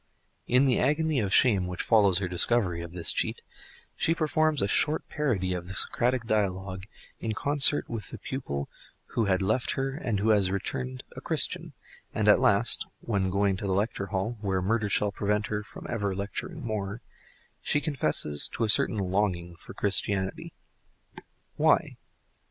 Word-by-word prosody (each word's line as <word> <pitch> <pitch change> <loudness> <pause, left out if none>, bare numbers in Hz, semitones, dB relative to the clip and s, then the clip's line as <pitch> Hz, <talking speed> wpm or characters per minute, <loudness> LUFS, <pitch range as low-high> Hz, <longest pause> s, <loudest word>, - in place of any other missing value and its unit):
In 125 +3 +4
the 130 -3 +2
agony 150 +1 +1
of 100 -4 -1
shame 100 -5 +4
which 90 -1 -3
follows 100 -5 +4
her 95 0 -1
discovery 90 0 +1
of 85 0 -8
this 85 -2 0
cheat - - -1 0.5
she 165 - +1
performs 155 -1 +1
a 100 - +1
short 150 +9 +1
parody 110 -12 -1
of 90 -1 -5
the 95 - -7
Socratic 125 +4 0
dialogue 95 -3 -2 0.3
in 110 -1 -2
concert 145 +4 +3
with 115 -3 -6
the - - -8
pupil 70 - -4 0.5
who 115 - +1
had 95 -1 +1
left 110 +6 0
her 135 0 -2
and 115 -7 -2
who 110 +3 +1
has 100 -4 +3
returned 65 -9 -4
a - - -8
Christian, - - +1 0.4
and - - 0
at - - +7
last, - - +4
when 100 -4 -1
going 100 0 +1
to 100 - -4
the 95 - 0
lecture 100 0 -1
hall 100 +5 -3
(where 95 -3 0
murder 105 +3 0
shall 100 +1 +1
prevent 105 +1 -1
her 105 +1 -3
from 105 - -11
ever 100 -4 -2
lecturing 100 +5 -5
more) 105 -1 -3 0.6
she 150 - +1
confesses 100 - 0
to 115 - -3
a 110 - 0
certain 110 - +3
longing 90 -3 -1
for - - -12
Christianity. 95 -2 -1 1.1
Why? - - +2
100 Hz, 170 wpm, -28 LUFS, 95-120 Hz, 1.1 s, at